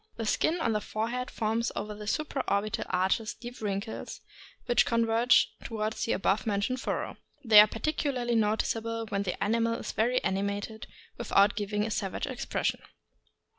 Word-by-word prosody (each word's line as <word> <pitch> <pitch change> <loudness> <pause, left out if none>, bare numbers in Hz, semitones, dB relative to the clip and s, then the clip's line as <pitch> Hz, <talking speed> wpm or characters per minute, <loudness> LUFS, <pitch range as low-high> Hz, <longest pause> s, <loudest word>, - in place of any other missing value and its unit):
The 225 - -4
skin 320 +10 +1
on 230 - +1
the 210 -1 0
forehead 235 +5 -3
forms 225 +1 -1
over 210 0 -4
the 210 0 -9
supra 280 +1 -1
orbital 200 +1 0
arches 190 +4 0
deep 245 0 -10
wrinkles, 205 +1 -4 0.4
which 240 - +4
converge 230 +1 +3
toward 215 -1 -2
the 225 - -1
above 195 +3 0
mentioned 215 +5 0
furrow. - - -3 0.3
They 215 -2 +9
are 210 - +9
particularly 250 0 -1
noticeable 225 +1 0
when 200 - -1
the 190 -3 -2
animal 230 +2 +1
is - - -5
very 245 +3 +2
animated, 200 +3 -2 0.3
without 205 -3 +3
giving 210 0 -1
a 225 - -3
savage 195 -3 -2
expression. 260 -3 -2
220 Hz, 155 wpm, -29 LUFS, 210-235 Hz, 0.4 s, They